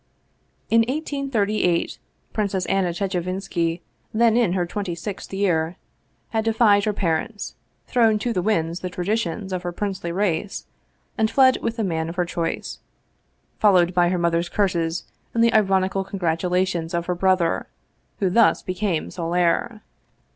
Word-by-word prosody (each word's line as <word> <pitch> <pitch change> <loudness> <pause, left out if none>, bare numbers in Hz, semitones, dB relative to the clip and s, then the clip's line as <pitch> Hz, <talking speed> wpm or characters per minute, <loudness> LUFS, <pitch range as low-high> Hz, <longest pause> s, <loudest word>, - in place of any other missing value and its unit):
In 230 - +6
1838 245 - 0 0.3
Princess 200 -3 -1
Anna 195 -2 +1
Chechevinski, 180 -2 -2 0.3
then 230 0 +3
in 230 -7 +3
her 180 -2 +1
twenty 185 -1 -4
sixth 190 +3 -6
year, 180 -4 0 0.5
had 220 -1 0
defied 220 -2 +4
her 215 - +2
parents, 200 +2 -2 0.3
thrown 225 -3 +3
to 235 +3 -2
the 185 - 0
winds 170 -4 0
the 185 - -4
traditions 190 +1 -2
of 180 - -2
her 175 -1 -3
princely 185 -2 -3
race, 195 +1 -1 0.5
and 220 0 +3
fled 260 0 +5
with 230 0 -2
the 225 - 0
man 165 -4 -1
of 165 - -6
her 180 -1 +1
choice, 170 -1 -3 0.8
followed 185 -4 +4
by 175 -1 +3
her 180 - 0
mother's 170 0 +1
curses 170 -5 0 0.3
and 230 - +4
the 235 - +4
ironical 195 -2 +2
congratulations 180 -1 -1
of 170 0 -1
her 180 - 0
brother, 180 -2 +1 0.5
who 195 - +1
thus 230 +3 +4
became 185 -2 -2
sole 170 -1 -3
heir. 180 +6 +1
185 Hz, 145 wpm, -23 LUFS, 175-215 Hz, 0.8 s, In